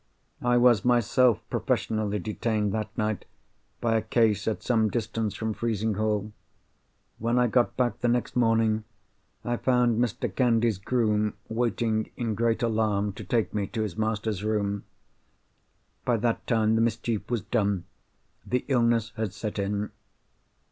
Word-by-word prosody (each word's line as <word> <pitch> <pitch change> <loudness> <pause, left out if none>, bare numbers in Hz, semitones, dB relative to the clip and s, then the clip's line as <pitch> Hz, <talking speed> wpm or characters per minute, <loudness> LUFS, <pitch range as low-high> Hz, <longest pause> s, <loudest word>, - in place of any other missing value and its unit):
I 120 0 +3
was 120 -4 +5
myself 120 -1 +3
professionally 110 -2 0
detained, 105 0 -1
that 110 -1 -2
night, 110 -2 -1 0.6
by 115 -1 +2
a - - +1
case 110 -2 +1
at 110 - -1
some 110 -3 +2
distance 110 -1 -2
from 110 -1 -2
Frizinghall. 110 -1 -1 0.9
When 115 +2 +1
I 125 - +4
got 120 +1 +1
back 120 -3 0
the 120 - 0
next 120 0 0
morning, 115 -2 +2 0.6
I 120 0 0
found 125 -3 +2
Mr. 120 -3 -3
Candy's 115 -5 +2
groom 105 -1 +1
waiting 110 -1 0
in 115 -3 -1
great 115 +2 0
alarm 105 -3 +1
to - - -8
take 115 -3 0
me 105 -2 -1
to 110 +1 -2
his 105 -5 -4
master's 110 -2 -1
room. 100 -2 -1 1.2
By 120 -2 +2
that 115 +1 -1
time 110 -2 +2
the 115 - +3
mischief 115 -1 -1
was 120 -3 0
done; 100 -5 0 0.6
the 125 0 -1
illness 115 -4 +2
had 110 -4 -2
set 105 -1 -4
in." 100 +1 -2
110 Hz, 145 wpm, -27 LUFS, 105-120 Hz, 1.2 s, was